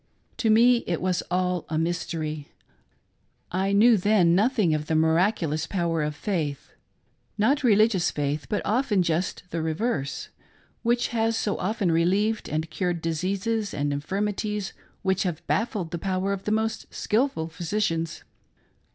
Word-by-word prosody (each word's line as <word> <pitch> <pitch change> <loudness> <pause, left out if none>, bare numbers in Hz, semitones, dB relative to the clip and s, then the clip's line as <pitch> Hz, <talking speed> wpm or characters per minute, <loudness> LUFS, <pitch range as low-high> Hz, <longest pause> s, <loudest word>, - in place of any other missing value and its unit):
To 225 - +1
me 240 +3 +6
it 170 - -1
was 180 -1 0
all 180 -1 0
a 155 - -1
mystery. 160 -3 -2 1.0
I 190 +2 0
knew 220 +3 +6
then 190 -3 +3
nothing 205 -3 +3
of 150 0 -2
the 160 - 0
miraculous 160 -1 +2
ppwer 165 -5 0
of 150 - -5
faith— 150 -6 -3 0.7
not 270 +8 +2
religious 215 -5 +4
faith, 145 0 -2
but 210 - -1
often 215 -4 +2
just 170 +2 -1
the 165 - -2
reverse, 160 - -2 0.5
which 240 +1 +1
has 225 -1 0
so 205 - 0
often 195 -2 0
relieved, 195 +7 +1
and 155 +1 -1
cured 175 0 -1
diseases 195 +6 -1
and 145 0 -1
infirmities 205 +6 -2 0.3
which 190 -1 +1
have 175 -4 -2
bafl[led 205 -6 -1
the: 170 - -3
power 190 +2 -1
of 195 -1 -6
the 210 - 0
most 220 0 -1
skilful 215 - 0
physicians. 165 -1 -2
185 Hz, 145 wpm, -26 LUFS, 160-215 Hz, 1.0 s, me